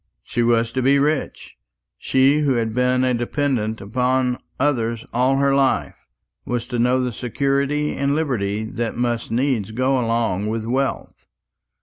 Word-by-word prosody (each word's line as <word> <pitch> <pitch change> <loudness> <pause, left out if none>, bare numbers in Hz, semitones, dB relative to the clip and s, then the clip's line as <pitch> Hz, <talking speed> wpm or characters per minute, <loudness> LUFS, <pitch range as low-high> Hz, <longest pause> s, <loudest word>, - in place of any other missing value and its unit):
She 120 - -2
was 115 -1 +2
to 130 - -1
be 135 +2 +4
rich. 145 - -2 0.4
She 135 +3 +3
who 145 -3 +2
had 115 -2 -1
been 125 +1 +2
a 130 -1 +2
dependant 120 -3 -1
upon 125 +4 0 0.2
others 115 -5 0
all 125 +3 +2
her 140 0 +2
life 135 -1 0 0.4
was 120 -1 -3
to 120 -2 -2
know 125 +2 +2
the 125 -1 -2
security 140 +5 -1
and 140 +1 0
liberty 110 -9 -1
that 115 +1 -4
must 120 -1 -1
needs 120 -3 0
go 130 +4 +1
along 115 -4 0
with 110 0 -2
wealth. 130 +3 -3
125 Hz, 150 wpm, -21 LUFS, 115-135 Hz, 0.4 s, be